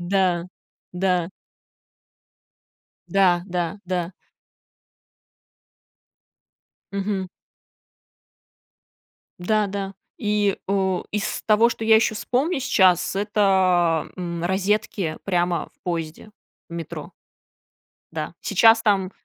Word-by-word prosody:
Да, 180 -1 +1 0.5
да. 180 -2 0 1.8
Да, 180 -3 +3
да, 180 +1 -3
да. 180 -1 -2 2.8
Мгм. 200 -1 -2 2.1
Да, 210 +3 +1
да, 195 0 -4 0.2
и, 210 -2 +1
э, 190 -2 +1
из 210 -1 -2
того, 220 +2 +4
что 225 - -5
я 220 0 +6
ещё 220 -1 +2
вспомню 270 +8 0
сейчас, 190 -8 +3
это, 190 -5 +2
м, 170 -2 -4
розетки 190 -2 0
прямо 175 -2 0
в - - -44
поезде, 165 +3 -4 0.4
в 170 - -10
метро. 165 0 -6 1.0
Да, - - -4
сейчас 225 0 +5
там 195 -3 +2
190 Hz, 85 wpm, -23 LUFS, 175-210 Hz, 2.8 s, я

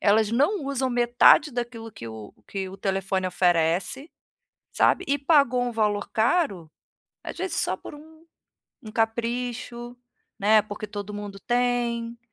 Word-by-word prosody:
elas 215 +1 +3
não 290 - +1
usam 265 -2 -1
metade 245 +5 +5
daquilo 240 -2 -5
que 115 - -10
o 110 -2 -9
que 190 -1 -4
o 190 - -10
telefone 190 -1 -1
oferece, 180 - +1 0.6
sabe? 375 - +3
E 285 +1 +1
pagou 275 -4 +3
um 245 -1 -2
valor 210 -2 0
caro, 220 - 0 0.5
às - - -7
vezes 365 -1 -3
só - - +1
por - - -11
um 315 +2 -14 0.7
um 215 - -9
capricho, 240 +1 -2 0.4
né, 215 +1 +5
porque 215 0 -7
todo 205 0 -7
mundo 205 -1 -7
tem. 240 0 -1
230 Hz, 140 wpm, -25 LUFS, 205-250 Hz, 0.7 s, metade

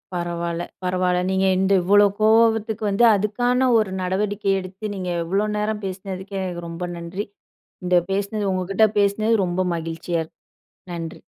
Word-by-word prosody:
பரவால்ல 170 -1 -3 0.2
பரவால்ல. 180 0 +1
நீங்க 190 0 +1
இந்த 190 +1 +2
இவ்ளோ 205 +3 +6 0.2
கோவத்துக்கு 220 0 +3
வந்து 200 +4 +2
அதுக்கான 245 +5 +1
ஒரு 215 -4 +1
நடவடிக்கை 200 +2 -1
எடுத்து, 190 +3 -6
நீங்க 185 -2 -4 0.2
இவ்ளோ 195 +5 0
நேரம் 210 0 -2
பேசுனதுக்கு 190 +1 -6
எனக்கு 175 -2 -4
ரொம்ப 170 +2 -6
நன்றி. 170 +4 -5 0.6
இந்த 180 0 +2 0.2
பேசுனது 200 +1 -1
உங்க 185 -1 -2
கிட்ட 220 +3 +5
பேசினது 205 +3 +2
ரொம்ப 175 +1 -1
மகிழ்ச்சியா 165 +1 -3
இருக்கு. - - -27 0.6
நன்றி. 165 -1 -6
190 Hz, 145 wpm, -22 LUFS, 180-210 Hz, 0.6 s, இவ்ளோ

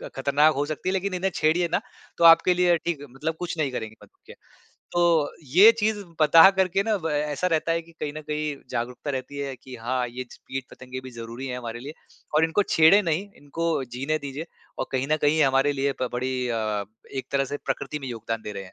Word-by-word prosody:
ख़तरनाक 145 +3 +3
हो 145 +1 0
सकती 155 +4 -3
है - - 0
लेकिन 190 0 -1
इन्हें 185 +1 -1
छेड़िए 170 +1 +2
ना, 180 - +1 0.4
तो 170 - 0
आपके 165 +2 +7
लिए 175 -1 +3
ठीक 170 -3 -3
है 145 - -9
मतलब 155 +5 -4
कुछ 175 -1 -4
नहीं 145 -4 0
करेंगे 110 -3 -5
मधुमक्खियाँ। - - -17 0.6
तो 170 -4 +3
ये 185 - +7
चीज़ 210 -1 0 0.2
पता 165 +4 +8
करके 190 0 +1
ना 215 0 +1
ब 160 - -1
ऐसा 150 +3 -1
रहता 165 -1 +1
है 165 0 0
कि 170 - -18
कहीं 150 -1 -3
न - - -5
कहीं 150 -1 -2 0.2
जागरूकता 125 +5 -3
रहती 135 +1 -5
है 140 -2 -4
कि 130 -1 -9
हाँ 125 +1 -1
ये 125 +2 -6
ज - - -11
कीट 135 -1 -4
पतंगे 130 0 -8
भी 130 - -10
ज़रूरी 115 +2 -7
हैं 125 -1 -4
हमारे 120 -1 -6
लिए 145 +5 -8 0.4
और 155 - +5
इनको 200 +5 +1
छेड़े 160 +6 +6
नहीं 180 +3 -1
इनको 160 +1 -2
जीने 145 +5 -1
दीजिये 145 +3 -6 0.3
और - - -2
कहीं 130 +1 -1
न 155 - +4
कहीं 150 +2 +3
हमारे 135 +2 +3
लिए 140 0 0
बड़ी 125 0 -2
अ, 110 -3 -1 0.3
एक 130 - -4
तरह 135 0 +1
से 145 +2 -4
प्रकृति 140 +2 -3
में 135 - -6
योगदान 115 -1 -4
दे 105 - -6
रहे - - -8
हैं। 100 - -6
145 Hz, 225 wpm, -25 LUFS, 130-165 Hz, 0.6 s, पता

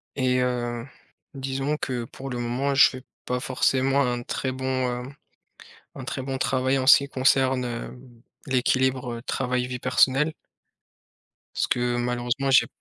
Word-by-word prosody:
et 130 -2 +1
heu, 120 -2 -2 0.5
disons 135 +2 -2
que, 125 -5 -3
pour 135 +3 -9
le 125 -2 -4
moment, 130 +4 -1
je 135 - +7
fais 130 -1 -9 0.2
pas 125 0 -1
forcément 135 +1 +1
un 120 -2 -1
très 130 +2 -3
bon, 130 0 -6
hem, 130 0 -2 0.8
un - - -7
très - - -4
bon 135 0 -3
travail 130 0 +1
en 130 0 -2
ce - - +10
qui 140 0 -5
concerne, 130 -1 +2
hem, 120 0 -8 0.3
l'équilibre, 130 -1 +1
heu, 115 - -7
travail, 125 0 -1
vie 125 0 -5
personnelle 130 +4 +3 1.2
parce - - 0
que 120 0 0
malheureusement 125 +2 -1
j'ai 130 - +5
130 Hz, 155 wpm, -25 LUFS, 125-135 Hz, 1.2 s, ce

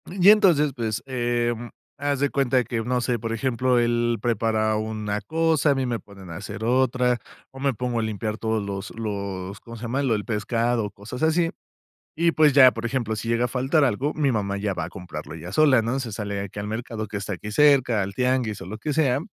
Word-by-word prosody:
Y 185 +1 +4
entonces, 175 -9 +4
pues, 110 -2 -2
em, 120 -2 -1 0.3
haz 145 -1 -1
de 145 0 +2
cuenta 130 -2 +2
que, 115 0 -3
no 125 +2 0
sé, 120 -1 0
por 115 +1 -3
ejemplo, 125 +1 +1
él 120 0 +1
prepara 110 -2 +1
una 105 -1 -3
cosa, 160 +5 +2
a - - +2
mí 135 -1 0
me 120 -2 -2
ponen 95 -3 -13
a 80 - -6
hacer 105 +3 -7
otra, 125 0 +2 0.3
o 135 - -11
me 135 0 +1
pongo 120 +1 -2
a - - +1
limpiar 110 0 -3
todos 110 -1 -1
los 100 0 -5
los, 100 -2 -4
¿cómo 115 +1 -11
se 115 - -11
llama? 125 +4 -1
Lo 130 -5 +2
el 105 - -4
pescado, 115 0 0
cosas 105 +6 -9
así. 165 +1 +2 0.7
Y, 170 +1 +3
pues, 155 -3 +4
ya, 130 -2 +8
por 115 -1 -6
ejemplo, 120 -3 -1
si 110 +2 -5
llega 115 +1 +2
a - - 0
faltar 135 +5 +1
algo, 135 +4 0
mi 145 -3 +2
mamá 100 -3 -1
ya 100 0 -1
va - - -3
a - - -8
comprarlo 85 -5 -8
ella 85 +3 -8
sola, 135 0 +5
¿no?, 120 +4 -1
se 120 -4 -5
sale 100 -1 -4
aquí 100 +1 -7
al 100 - -4
mercado 110 0 -4
que 105 0 -5
está 100 +1 -4
aquí 105 +4 -7
cerca, 130 -4 +4
al 100 +1 -3
tianguis 125 -4 0
o - - -7
lo 105 +5 -6
que 150 +7 -2
sea. 140 -4 +2
120 Hz, 225 wpm, -24 LUFS, 105-130 Hz, 0.7 s, ya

